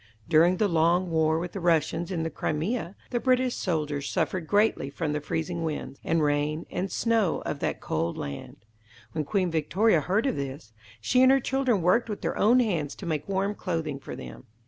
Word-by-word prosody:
During 170 Hz, +3 st, +4 dB
the 210 Hz, -, +2 dB
long 170 Hz, +1 st, +2 dB
war 160 Hz, -1 st, +2 dB
with 170 Hz, +1 st, -3 dB
the 195 Hz, -, -5 dB
Russians 165 Hz, 0 st, +1 dB
in 170 Hz, -4 st, -2 dB
the 165 Hz, -, -3 dB
Crimea, 175 Hz, -, -2 dB, 0.2 s
the 240 Hz, -, 0 dB
British 255 Hz, 0 st, +2 dB
soldiers 150 Hz, -5 st, -2 dB
suffered 170 Hz, 0 st, -1 dB
greatly 205 Hz, -8 st, +2 dB
from 150 Hz, +1 st, -3 dB
the 150 Hz, -, -2 dB
freezing 165 Hz, +3 st, -3 dB
winds, 150 Hz, -3 st, -4 dB
and 165 Hz, -1 st, +1 dB
rain, 150 Hz, +2 st, 0 dB
and 185 Hz, +1 st, -3 dB
snow, 225 Hz, -6 st, +1 dB
of -, -, -3 dB
that -, -, -2 dB
cold 85 Hz, +2 st, -2 dB
land. 70 Hz, +9 st, -7 dB, 0.5 s
When 155 Hz, -2 st, -2 dB
Queen 185 Hz, 0 st, 0 dB
Victoria 170 Hz, +4 st, +2 dB
heard 195 Hz, -, 0 dB
of 270 Hz, -, 0 dB
this, 135 Hz, -4 st, -6 dB, 0.3 s
she 250 Hz, -, +3 dB
and 260 Hz, 0 st, +7 dB
her 270 Hz, -, +5 dB
children 260 Hz, -7 st, 0 dB
worked 225 Hz, +7 st, +3 dB
with 210 Hz, -, -4 dB
their -, -, -1 dB
own 240 Hz, +4 st, +4 dB
hands 170 Hz, -, -1 dB
to -, -, -9 dB
make 155 Hz, 0 st, -3 dB
warm 195 Hz, +1 st, 0 dB
clothing 165 Hz, -8 st, -3 dB
for -, -, -8 dB
them. -, -, -10 dB
170 Hz, 195 wpm, -27 LUFS, 150-205 Hz, 0.5 s, and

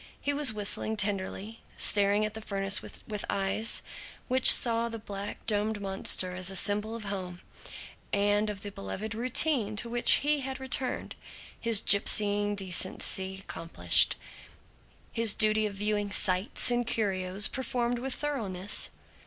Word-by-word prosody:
He 285 Hz, -, -2 dB
was 285 Hz, -3 st, +3 dB
whistling 215 Hz, +1 st, 0 dB
tenderly, 205 Hz, +2 st, -4 dB, 0.2 s
staring 205 Hz, +1 st, +3 dB
at 215 Hz, -, -5 dB
the 220 Hz, -, -7 dB
furnace 195 Hz, -1 st, -1 dB
with -, -, -10 dB, 0.3 s
eyes 200 Hz, +3 st, -2 dB, 0.5 s
which 255 Hz, 0 st, +7 dB
saw 235 Hz, -1 st, +3 dB
the 230 Hz, -, -6 dB
black 205 Hz, -2 st, -7 dB
domed 210 Hz, 0 st, -1 dB
monster 190 Hz, -2 st, +1 dB
as 185 Hz, 0 st, +1 dB
a 195 Hz, -, -3 dB
symbol 210 Hz, +3 st, +1 dB
of 230 Hz, -, -7 dB
home 185 Hz, -3 st, -6 dB, 0.7 s
and 205 Hz, +1 st, +1 dB
of 200 Hz, -2 st, -7 dB
the 205 Hz, -, -7 dB
beloved 195 Hz, -, -7 dB
routine 240 Hz, -1 st, +2 dB
to 235 Hz, +2 st, -2 dB
which 240 Hz, 0 st, +4 dB
he 300 Hz, 0 st, +2 dB
had 265 Hz, -1 st, -5 dB
returned 265 Hz, -1 st, -3 dB, 0.5 s
his 230 Hz, -3 st, +3 dB
gipsying 205 Hz, 0 st, +3 dB
decently 190 Hz, 0 st, -1 dB
accomplished, 165 Hz, -3 st, +2 dB, 1.0 s
his 230 Hz, -3 st, +1 dB
duty 215 Hz, 0 st, +2 dB
of 200 Hz, -, -9 dB
viewing 205 Hz, 0 st, -2 dB
"sights" 195 Hz, +4 st, +2 dB
and 240 Hz, -1 st, -1 dB
"curios" 195 Hz, -3 st, -1 dB
performed 245 Hz, -1 st, -3 dB
with 265 Hz, +1 st, -4 dB
thoroughness. 210 Hz, -10 st, -2 dB
210 Hz, 140 wpm, -28 LUFS, 195-230 Hz, 1.0 s, which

